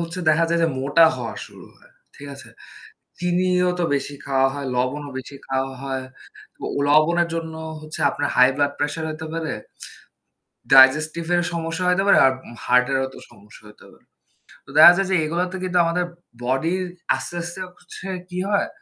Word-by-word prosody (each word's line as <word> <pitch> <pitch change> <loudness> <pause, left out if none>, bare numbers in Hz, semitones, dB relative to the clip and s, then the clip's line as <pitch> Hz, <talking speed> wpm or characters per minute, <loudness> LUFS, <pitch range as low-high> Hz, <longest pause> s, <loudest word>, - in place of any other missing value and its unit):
হচ্ছে 170 +1 -5
দেখা 155 +2 +4
যায় 170 - +2
যে 165 - +3
মোটা 145 +5 +4
হওয়া - - -5
শুরু - - -15
হয়। 485 +1 -23 0.3
ঠিক 145 - -11
আছে? 135 -4 -13 0.7
চিনিও 180 +1 +1
তো - - +1
বেশি 140 +1 -4
খাওয়া 135 -1 +2
হয়, 140 0 -5
লবণও 135 +4 -2
বেশি 130 +2 -8
খাওয়া 135 0 -2
হয়। 130 -1 -4 0.7
ও - - -1
লবণের 170 +4 +3
জন্য 165 -1 -4 0.3
হচ্ছে 155 0 -9
আপনার 145 +1 -2
হাই 125 0 +6
ব্লাড 145 0 +1
প্রেশার 150 +2 -2
হতে 155 +1 -7
পারে, 165 -1 -3 1.2
ডাইজেস্টিভ 155 +5 +6
এর 175 - +2
সমস্যা 165 +1 -3
হতে 180 +2 +2
পারে - - +6
আর 130 - +3 0.3
হার্টেরও 125 +2 +2
তো - - -11
সমস্যা 105 +2 -17
হতে 105 - -17
পারে। - - -23 0.6
তো - - -19
দেখা - - +11
যায় 195 -1 0
যে - - +3
এগুলোতে 180 +4 -2
কিন্তু 180 -1 -1
আমাদের 175 +2 0 0.4
বডির 160 +9 0 0.3
আস্তে, - - -6
আস্তে 175 +2 -6 0.2
হচ্ছে 180 +2 -10 0.2
কি 180 - -7
হয়, 205 -1 +1
155 Hz, 170 wpm, -22 LUFS, 135-175 Hz, 1.2 s, দেখা